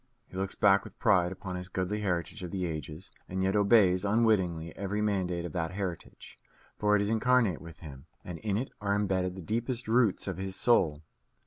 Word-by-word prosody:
He - - -13
looks 95 0 -3
back 100 -1 +4
with - - -13
pride 90 -3 +3
upon 95 -1 -6
his 90 0 -5
goodly 95 +3 -2
heritage 90 0 -2
of 90 - -5
the 95 0 -2
ages, 80 +2 -6 0.2
and 95 +1 -2
yet 95 +2 +1
obeys 100 -3 +4
unwittingly 100 -7 +1
every 100 +1 -3
mandate 95 -5 -1
of 85 - -6
that 85 +1 -2
heritage; 95 -3 -6 0.4
for 105 0 +3
it 100 - +2
is 100 - -1
incarnate 115 -5 +2
with 85 -1 -12
him, 70 -5 -11 0.2
and 85 -2 -6
in 105 -2 -1
it 130 +4 -3
are 100 0 +1
embedded 95 -3 0
the 95 - -8
deepest 120 +5 -2
roots 115 -4 +2
of 95 -3 -3
his 95 0 -4
soul. 80 -12 +2
95 Hz, 200 wpm, -30 LUFS, 90-105 Hz, 0.4 s, back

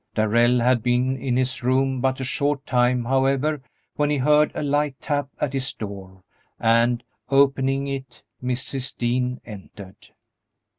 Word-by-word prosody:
Darrell 120 +3 +3
had 125 0 +3
been 125 +2 +1
in 130 -2 -1
his 130 0 -1
room 130 +1 +1
but 130 0 0
a - - -3
short 140 +2 -1
time, 125 -1 +2
however, 135 +3 +1 0.4
when 145 0 +1
he 150 - +1
heard 150 +3 +3
a - - -2
light 145 -1 0
tap 145 -2 -2
at 140 - -1
his 135 -1 -2
door, 95 -3 -8 0.4
and, 115 +1 +2 0.3
opening 135 0 +2
it, 135 -3 -6 0.2
Mrs. 130 +1 -3
Dean 125 +1 -1
entered. 100 -2 -12
130 Hz, 145 wpm, -23 LUFS, 120-135 Hz, 0.4 s, Darrell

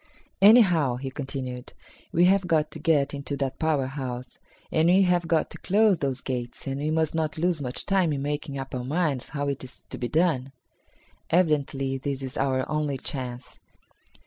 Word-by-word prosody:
"Anyhow," 185 - +6
he 135 +1 -5
continued, 130 -2 -5 0.4
"we 175 +2 +4
have 190 0 +3
got 155 -3 +1
to 160 - -7
get 150 -3 +2
into 140 0 -4
that 135 -1 -3
power 155 -4 +1
house, 130 -2 -6 0.3
and 160 +1 +3
we 190 +2 +6
have 175 -2 +2
got 160 -1 +1
to - - -7
close 205 -1 +3
those 135 -3 -2
gates, 120 -2 -4
and 135 0 -3
we 150 - -1
must 160 -1 +1
not 155 -2 -1
lose 170 -1 0
much 125 -2 -3
time 190 -5 +2
in 140 -2 -2
making 145 -1 -3
up 135 0 -6
our 125 -1 -3
minds 145 -2 -1
how 145 -1 -3
it 140 -2 -3
is 130 0 -9
to - - -5
be 120 - -1
done. 145 -4 +1 0.8
Evidently 140 -5 +1
this 140 0 -3
is 130 -1 -5
our 130 -1 0
only 150 -2 -1
chance. 125 -2 -6
145 Hz, 185 wpm, -26 LUFS, 135-160 Hz, 0.8 s, Anyhow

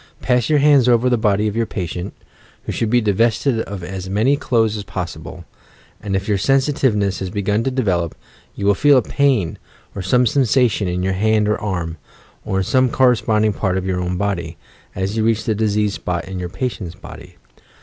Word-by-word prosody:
Pass 125 -2 +1
your 155 - +4
hands 140 -3 +5
over 120 +1 +3
the - - +4
body 105 -1 +1
of 105 - -3
your 115 -1 0
patient, 90 0 -5 0.5
{who - - -4
should 115 - -1
be 120 +1 +3
divested 115 +4 +1
of 100 -4 -5
as 95 +1 -6
many 110 +8 +2
clothes 115 -6 +1
as 105 - -5
possible), 90 -2 -7 0.6
and 100 -1 -3
if 95 +1 -2
your 105 -2 +1
sensitiveness 130 -6 +1
has 95 - -4
begun 105 +3 -1
to 135 - 0
develop, 95 -11 -1 0.4
you 100 - -4
will 100 - +5
feel 145 +6 +4
a 125 - +3
pain 130 - 0 0.3
or 100 - -5
some 125 +7 +2
sensation 120 -4 +2
in 90 0 -2
your 95 0 0
hand 105 +2 +2
or 105 - 0
arm, 85 -5 -3 0.5
or 95 - -2
in 95 - +1
some 130 +6 +2
cor 130 +1 +4
responding 110 -3 +1
part 95 -2 -1
of 95 - -3
your 95 -1 -1
own 90 0 -2
body, 90 -5 -3 0.4
as 95 +3 -2
you 110 - 0
reach 110 -1 +1
the 110 - 0
diseased 105 -1 0
spot 90 -3 -4
in 95 -1 -5
your 90 -1 -4
patient's 95 -3 -4
body. - - -12
105 Hz, 200 wpm, -19 LUFS, 95-120 Hz, 0.6 s, hands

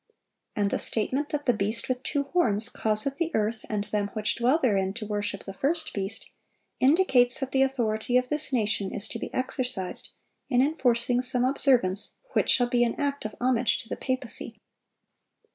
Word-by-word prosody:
And 205 -2 0
the - - 0
statement 260 +7 0
that 295 -1 -3
the 245 - +4
beast 215 +2 -1
with 255 -1 -2
two 285 +1 -1
horns 235 - +1
"causeth 220 +6 +2
the 335 0 0
earth 215 +1 -1
and 210 -2 -1
them 205 -1 -2
which 215 0 0
dwell 250 +6 +2
therein 195 - +1
to 220 - -5
worship 205 -1 -3
the 195 - -7
first 315 - -1
beast," 195 -1 -4 0.5
indicates 265 -4 +4
that 270 -2 -3
the 265 - +2
authority 245 -3 +1
of 250 0 +1
this 300 -1 -1
nation 210 -5 0
is 205 - -3
to - - -5
be - - -6
exercised 255 -7 -3 0.4
in 250 -3 +2
enforcing 250 -4 +2
some 250 0 +3
observance 250 -8 +2 0.2
which - - +1
shall 245 - +5
be 240 0 +2
an 235 - 0
act 285 -4 -2
of 215 - -5
homage 250 -1 +1
to 225 - -20
the - - -2
papacy. 260 -2 -3
245 Hz, 180 wpm, -27 LUFS, 215-270 Hz, 0.5 s, shall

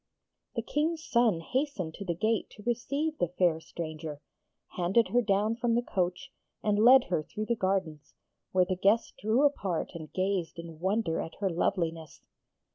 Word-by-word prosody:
The - - -1
King's 315 +2 -1
son 235 - +3
hastened 235 - -2
to 200 - -7
the 170 -2 -1
gate 220 +5 0
to 210 - -12
receive 280 +7 -1
the 175 - +2
fair 175 -2 +1
stranger, 155 -2 -6 0.5
handed 185 +6 +2
her 245 - +3
down 210 +1 +1
from 240 -1 +1
the 240 - +1
coach, 190 +6 -2 0.3
and 210 -1 +2
led 255 +2 +8
her 165 - +2
through 215 +7 -5
the 235 - 0
gardens, 185 -7 -2 0.4
where 185 -1 +4
the 185 +1 -1
guests 205 +5 +2
drew 220 +6 +2
apart 195 - 0
and 160 -3 -8
gazed 185 -4 -1
in 165 -2 -9
wonder 190 -2 0
at 165 - -7
her 195 -2 -1
loveliness. 165 -2 -2
195 Hz, 170 wpm, -29 LUFS, 170-235 Hz, 0.5 s, led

